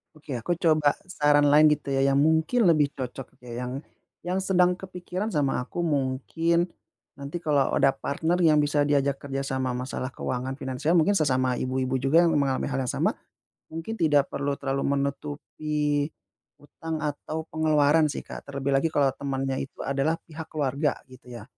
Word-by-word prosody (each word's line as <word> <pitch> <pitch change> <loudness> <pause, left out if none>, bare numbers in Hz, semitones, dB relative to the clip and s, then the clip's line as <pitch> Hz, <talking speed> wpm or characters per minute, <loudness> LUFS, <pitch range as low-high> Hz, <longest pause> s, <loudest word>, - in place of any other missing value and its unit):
Oke, 155 -1 -11
aku 175 +10 -1
coba 155 -4 +3
saran 145 -5 +3
lain 155 +1 +7
gitu 150 -2 0
ya, 135 0 +1
yang 135 - +3
mungkin 160 - +3
lebih 155 -3 +4
cocok, 130 0 -6 0.2
ya. 120 0 -5
Yang - - -5 0.5
yang 180 +2 -1
sedang 180 -2 +3
kepikiran 185 +1 -5
sama 140 -6 0
aku 175 +7 -4
mungkin 165 +4 0 0.5
nanti 140 +4 -5
kalau 145 -4 +1
ada - - +4
partner 160 +5 -1
yang 155 -2 +5
bisa 145 0 +1
diajak 140 -1 +1
kerja 135 -1 -4
sama 130 -1 -2
masalah 130 0 -4
keuangan 130 +1 -3
finansial, 135 +4 -1
mungkin 170 +4 +4
sesama 130 -5 +1
ibu-ibu 130 0 -1
juga 140 +7 +4
yang 170 - +3
mengalami 135 -2 0
hal 135 - -1
yang - - 0
sama, - - +1 0.6
mungkin 165 +7 -5
tidak 145 -3 +3
perlu 140 0 -1
terlalu 135 0 -2
menutupi 145 +1 -2 0.5
utang 160 +1 -6
atau 155 +1 -3
pengeluaran 155 0 +3
sih, 145 - -5
Kak. - - -10
Terlebih 140 0 -3
lagi 165 - +1
kalau 145 -3 +2
temannya 135 -1 -3
itu - - -11
adalah 140 +4 0
pihak 160 0 -9
keluarga, 145 0 0 0.2
gitu 130 0 -16
ya. 120 -3 -8
145 Hz, 165 wpm, -26 LUFS, 135-160 Hz, 0.6 s, lain